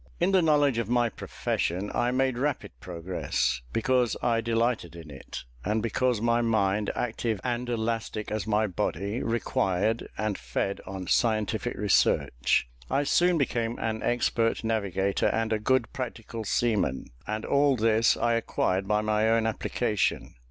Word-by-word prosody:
In 175 +3 +2
the 190 -1 +5
knowledge 145 -6 +3
of 115 -2 -2
my 120 -1 +2
profession 95 -2 -3
I 120 - +1
made 130 0 +1
rapid 140 +2 -2
progress, 85 -6 -2
because 125 - +1
I 115 -1 +2
delighted 115 -6 0
in 80 -3 -10
it, 65 - -8 0.2
and 105 +2 0
because 120 0 +1
my 115 +1 +2
mind, 105 -3 +1
active 115 -2 -2
and 120 0 -2
elastic 115 -2 -2
as 110 0 -2
my 110 0 +2
body, 100 - -2
required 110 -1 0
and 110 -2 -2
fed 100 - -2
on 95 -1 -5
scientific 110 +3 +1
research. 60 -12 +2 0.2
I 140 +2 +1
soon 175 +4 +3
became 120 -5 -1
an 110 -1 -2
expert 115 -1 +1
navigator 100 -3 0
and 115 0 0
a 110 - 0
good 125 +2 +1
practical 115 -3 -5
seaman, 105 - 0 0.2
and 110 +1 -3
all 140 -1 +3
this 115 0 +3
I 120 0 +1
acquired 95 -4 0
by 105 0 +2
my 110 +1 +1
own 115 0 +3
application. 110 -1 -1
115 Hz, 150 wpm, -27 LUFS, 105-120 Hz, 0.2 s, the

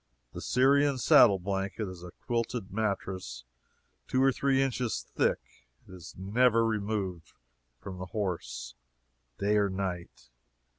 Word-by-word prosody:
The - - -7
Syrian 140 +2 +3
saddle 110 -3 +6
blanket 95 +2 -3
is 90 -2 -9
a 90 - -8 0.2
quilted 115 -4 -2
mattress 95 - -3 0.6
two 130 0 +2
or 135 - +5
three 135 +1 +1
inches 125 -3 0
thick. - - 0 0.5
It - - -13
is 90 -3 -11
never 115 +4 +3
removed 100 -6 -3 0.5
from 95 +3 -8
the 90 - -6
horse, 80 - -4 0.6
day 105 +1 +1
or 100 -1 +2
night. 90 -9 -5
100 Hz, 130 wpm, -29 LUFS, 90-120 Hz, 0.6 s, saddle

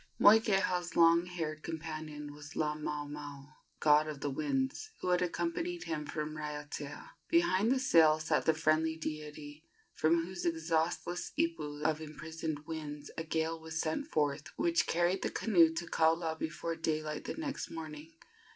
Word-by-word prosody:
Moikeha's 195 -5 +4
long 170 +1 +6
haired 160 -3 -4
companion 155 -2 -6
was 150 0 -11
Laamaomao, 150 -1 -4 0.3
god 150 0 +5
of 150 -2 -5
the 145 - -1
winds, 135 - -1
who - - -2
had 180 0 +3
accompanied 335 - -2
him 150 -2 -3
from 155 0 -3
Raiatea. 150 -1 -6 0.2
Behind 250 - +3
the 265 - +4
sail 165 -11 +5
sat 155 - 0
the 160 - +5
friendly 160 0 +2
deity, 150 -1 -6 0.3
from 165 +1 +2
whose 185 0 -6
exhaustless 165 +1 -1
ipu 150 - -1
of 160 0 +1
imprisoned 155 -1 -5
winds 150 -2 -6
a 165 - -3
gale 160 0 -1
was 160 0 -5
sent 160 - -1
forth 145 - 0
which 170 0 +2
carried 175 +3 +2
the - - 0
canoe 170 -7 +4
to 170 +1 -2
Kaula 160 0 +2
before 165 +1 -3
daylight 155 -1 -2
the - - -4
next 300 -3 -4
morning. 160 -1 -7
160 Hz, 150 wpm, -33 LUFS, 150-170 Hz, 0.3 s, long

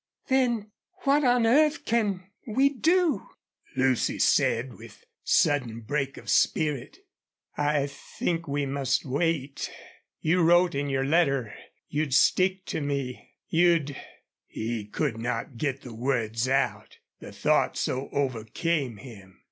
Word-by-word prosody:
"Then 240 -5 +1 0.3
what 285 +1 +3
on 245 -2 +3
earth 300 +6 +3
can 205 -5 0 0.2
we 265 +5 +3
do?" 330 +4 +1 0.5
Lucy 130 -2 +1
said, 120 +2 +2
with 115 0 -14 0.2
sudden 120 -6 +2
break 135 +4 -2
of - - -12
spirit. 145 -5 +1 0.6
"I 145 -1 +1
think 165 +3 -4
we 145 0 -1
must 135 0 -1
wait. 140 0 -1 0.5
You 175 +3 +2
wrote 175 +1 +4
in 140 +1 -2
your 135 0 0
letter 140 -7 +2 0.3
you'd 145 -3 -1
stick 185 +5 +3
to - - -3
me 140 -3 -4
you'd 165 -4 +2 0.3
" - - -65
He 110 -1 -4
could 115 0 -2
not 120 +1 -3
get 135 +1 -2
the 125 - -9
words 115 -1 -1
out, 125 -6 -1 0.2
the - - -10
thought - - +1
so 130 +2 -2
overcame 135 +1 -1
him. 100 -6 -13
140 Hz, 130 wpm, -27 LUFS, 125-175 Hz, 0.6 s, wrote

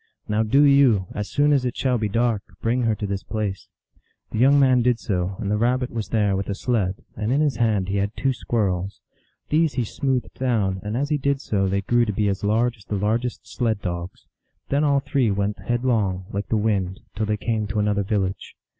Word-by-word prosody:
Now 105 +1 +1
do 125 +7 +4
you, 140 -9 +5
as 105 -1 -4
soon 145 +1 +3
as 135 -3 +2
it 125 -2 -3
shall 125 -3 +1
be 105 -1 -1
dark, 115 0 +1 0.2
bring 120 +3 0
her 110 -1 +2
to 105 - -4
this 100 -1 -3
place." 105 -3 -4 0.6
The 110 - -2
young 140 +3 +5
man 130 -2 +4
did 125 0 +2
so, 90 -1 -2
and 100 - -3
the 105 - +2
Rabbit 125 +2 +1
was 110 -5 -4
there 105 -4 +2
with 95 +1 -3
a 100 - -1
sled, 100 -5 -1
and 110 +1 -2
in 140 - +2
his 150 -3 +1
hand 110 -5 +1
he 100 +1 -1
had 100 +2 -2
two 135 -1 +1
squirrels. 100 -6 -2 0.5
These 160 0 +2
he 125 - +1
smoothed 130 +3 -2
down, 105 -7 0
and 105 +3 -3
as 140 +2 -1
he 150 - +1
did 140 0 0
so 100 -6 0
they 100 +1 0
grew 120 +4 +2
to 105 - -2
be 105 +1 +1
as 100 0 -3
large 115 +4 +1
as 105 - -18
the 105 - -3
largest 115 +5 -1
sled 110 -4 -1
dogs. 85 0 -5 0.4
Then 140 +2 +2
all 140 -2 +3
three 130 -4 +1
went 100 +1 -1
headlong, 115 -7 0
like 100 +1 -3
the 110 - +1
wind, 100 -4 -1
till 110 +1 -1
they 105 0 0
came 110 0 -1
to 100 +1 -4
an 105 0 +2
other 100 -1 +1
village. 95 -2 -2
110 Hz, 225 wpm, -23 LUFS, 100-125 Hz, 0.6 s, you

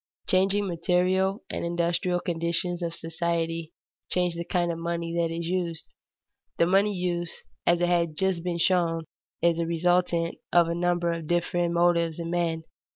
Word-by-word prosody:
The - - 0
changing 195 +2 +3
material 185 +3 +1
and - - -3
industrial 175 +1 0
conditions 170 +1 0
of 170 -1 -1
society 165 0 -2 0.4
change 180 -1 +1
the 170 0 -4
kind 175 0 0
of 165 - -5
money 170 0 -3
that 170 -1 +1
is 165 +1 -4
used. 170 -2 -3 0.7
The 170 - +4
money 195 +4 +3
use, 175 -2 -3 0.2
as 175 0 +4
has 175 -1 +3
just 190 0 +1
been 175 -1 -2
shown, 170 -1 +2 0.4
is 170 -1 +3
a 165 - 0
resultant 170 0 +1
of 175 -1 +5
a 170 - -1
number 175 0 +1
of 165 -2 -6
different 175 0 0
motives 170 -2 +2
in 170 -1 -4
men. 165 -2 0
170 Hz, 160 wpm, -27 LUFS, 170-180 Hz, 0.7 s, of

